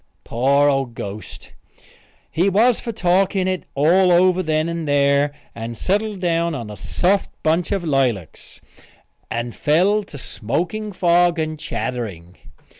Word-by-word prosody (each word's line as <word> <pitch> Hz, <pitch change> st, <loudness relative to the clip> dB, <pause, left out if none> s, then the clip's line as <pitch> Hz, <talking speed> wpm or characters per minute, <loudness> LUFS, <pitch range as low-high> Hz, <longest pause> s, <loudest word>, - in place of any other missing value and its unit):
Poor 140 Hz, +4 st, +2 dB
old 135 Hz, -4 st, 0 dB
ghost! 105 Hz, +1 st, -8 dB, 0.8 s
He 180 Hz, +5 st, +2 dB
was 225 Hz, +5 st, +3 dB
for 230 Hz, -, -5 dB
talking 190 Hz, -1 st, +1 dB
it 185 Hz, -4 st, -2 dB
all 175 Hz, +6 st, +4 dB
over 180 Hz, +1 st, +4 dB
then 155 Hz, -1 st, 0 dB
and 170 Hz, -2 st, -4 dB
there 140 Hz, 0 st, +2 dB, 0.2 s
and 115 Hz, 0 st, -6 dB
settled 205 Hz, -, -1 dB
down 170 Hz, -2 st, 0 dB
on 115 Hz, -5 st, -6 dB
a -, -, -7 dB
soft 190 Hz, -, 0 dB
bunch 165 Hz, +4 st, +1 dB
of 195 Hz, -3 st, -1 dB
lilacs, 130 Hz, -, -2 dB, 0.7 s
and 120 Hz, 0 st, -3 dB
fell 185 Hz, +8 st, +2 dB
to 145 Hz, -, -11 dB
smoking 170 Hz, -, -3 dB
fog 175 Hz, -2 st, +3 dB
and 155 Hz, -1 st, -3 dB
chattering. 100 Hz, -, -5 dB
160 Hz, 135 wpm, -20 LUFS, 135-185 Hz, 0.8 s, all